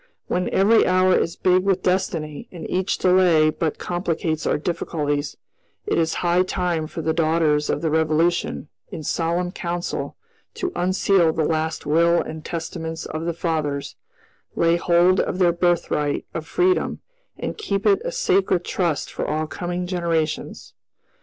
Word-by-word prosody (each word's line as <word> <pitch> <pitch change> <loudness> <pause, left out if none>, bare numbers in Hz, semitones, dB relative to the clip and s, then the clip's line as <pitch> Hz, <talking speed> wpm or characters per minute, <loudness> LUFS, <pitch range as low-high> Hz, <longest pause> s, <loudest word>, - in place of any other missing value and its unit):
When 180 0 -1
every 210 +4 +4
hour 185 0 +4
is 165 - 0
big 185 0 +3
with 190 -1 0
destiny, 165 -5 -1
and 175 - -7
each 185 +1 0
delay 180 -4 +4
but 155 -1 -2
complicates 165 -3 -2
our - - +2
difficulties, 150 -3 -2 0.5
it - - +1
is 160 -1 0
high 175 +1 +4
time 180 -3 -1
for 165 0 -6
the 160 - +1
daughters 155 -2 +1
of 145 - -1
the 160 - +1
Revolution, 160 +1 +1 0.2
in 155 - -6
solemn 170 +3 -1
council, 175 -2 -4 0.4
to 370 -1 -2
unseal 185 -1 +2
the 160 -1 0
last 160 0 -1
will 170 +3 +3
and 155 0 -5
testaments 165 0 -5
of 155 +1 -5
the 170 - -1
fathers, 155 -4 -2 0.6
lay 170 0 +3
hold 175 +2 +3
of 185 - -1
their 175 -2 +3
birthright 170 -4 0
of 160 -1 -5
freedom, 370 +1 +1 0.4
and - - -5
keep 200 - -2
it 200 -2 +4
a - - -3
sacred 185 -2 +1
trust 170 -5 -1
for - - -3
all 155 +1 -1
coming 175 +2 -4
generations. 170 -3 -2
170 Hz, 155 wpm, -22 LUFS, 160-180 Hz, 0.6 s, every